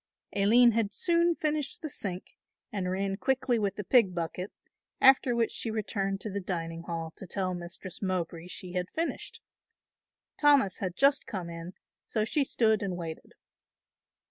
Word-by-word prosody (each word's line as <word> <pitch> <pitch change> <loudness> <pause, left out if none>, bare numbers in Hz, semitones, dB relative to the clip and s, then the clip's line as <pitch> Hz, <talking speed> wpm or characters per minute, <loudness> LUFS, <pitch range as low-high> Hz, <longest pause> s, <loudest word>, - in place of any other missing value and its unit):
Aline 230 +5 +6
had 220 -2 0
soon 340 0 +3
finished 305 -1 -2
the - - -1
sink 185 -6 -5 0.4
and 190 -3 -2
ran 195 +1 -1
quickly 260 -1 +1
with 200 -2 0
the 210 - -4
pig 200 -4 +4
bucket, 175 +3 -3 0.5
after 265 -2 +6
which 230 -1 +1
she 230 - -3
returned 200 -3 -2
to 215 - -3
the 200 - -2
dining 165 -3 -4
hall 165 -1 -5
to 195 - -8
tell 185 0 -1
Mistress 175 +1 -7
Mowbray 175 -3 -2
she 180 0 -6
had 180 0 -2
finished. 330 +1 -3 1.0
Thomas 285 -9 +4
had 185 -3 -3
just 275 +3 +3
come 180 -5 -4
in, 170 +2 -7 0.3
so 215 -2 0
she 285 +5 +2
stood 220 -5 +2
and 190 -3 -2
waited. 165 -2 -7
195 Hz, 160 wpm, -29 LUFS, 180-240 Hz, 1.0 s, Aline